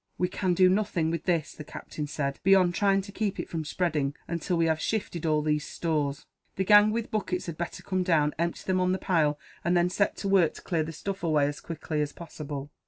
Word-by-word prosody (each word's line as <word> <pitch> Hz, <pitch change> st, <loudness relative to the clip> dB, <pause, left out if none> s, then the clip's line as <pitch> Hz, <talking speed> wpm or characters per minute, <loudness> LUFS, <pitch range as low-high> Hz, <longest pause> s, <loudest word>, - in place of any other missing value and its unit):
"We 180 Hz, -, +1 dB
can 185 Hz, -1 st, 0 dB
do 185 Hz, +1 st, +6 dB
nothing 185 Hz, -4 st, +1 dB
with 165 Hz, -1 st, -3 dB
this," 170 Hz, -4 st, 0 dB
the 155 Hz, -, -9 dB
captain 150 Hz, +1 st, -6 dB
said, 140 Hz, -2 st, -3 dB
"beyond 190 Hz, -2 st, +5 dB
trying 195 Hz, +1 st, +3 dB
to 200 Hz, +1 st, -10 dB
keep 205 Hz, -1 st, -2 dB
it -, -, -3 dB
from 165 Hz, -2 st, -3 dB
spreading, 150 Hz, -3 st, -1 dB
until 170 Hz, +1 st, -1 dB
we 165 Hz, -, +3 dB
have 160 Hz, -1 st, +1 dB
shifted 175 Hz, -7 st, -2 dB
all 155 Hz, -1 st, +2 dB
these 150 Hz, -1 st, +1 dB
stores. 150 Hz, -5 st, -2 dB, 0.3 s
The 190 Hz, -, 0 dB
gang 205 Hz, +2 st, +7 dB
with 225 Hz, +1 st, -2 dB
buckets 190 Hz, -4 st, -2 dB
had 170 Hz, -, -5 dB
better 170 Hz, +1 st, -5 dB
come 185 Hz, -1 st, -1 dB
down, 155 Hz, -5 st, +2 dB
empty 170 Hz, 0 st, -1 dB
them 185 Hz, -1 st, +1 dB
on 185 Hz, 0 st, +2 dB
the -, -, 0 dB
pile, 160 Hz, -7 st, +1 dB, 0.3 s
and 175 Hz, +2 st, +2 dB
then 175 Hz, +1 st, +2 dB
set 200 Hz, +2 st, +1 dB
to 200 Hz, -, -3 dB
work 190 Hz, -5 st, +3 dB
to -, -, -11 dB
clear 170 Hz, -4 st, 0 dB
the 155 Hz, +1 st, -3 dB
stuff 195 Hz, +5 st, -5 dB
away, 155 Hz, -4 st, +2 dB
as 145 Hz, +1 st, -3 dB
quickly 155 Hz, -2 st, -3 dB
as 150 Hz, -1 st, -2 dB
possible." 145 Hz, -4 st, -7 dB
170 Hz, 235 wpm, -28 LUFS, 155-185 Hz, 0.3 s, gang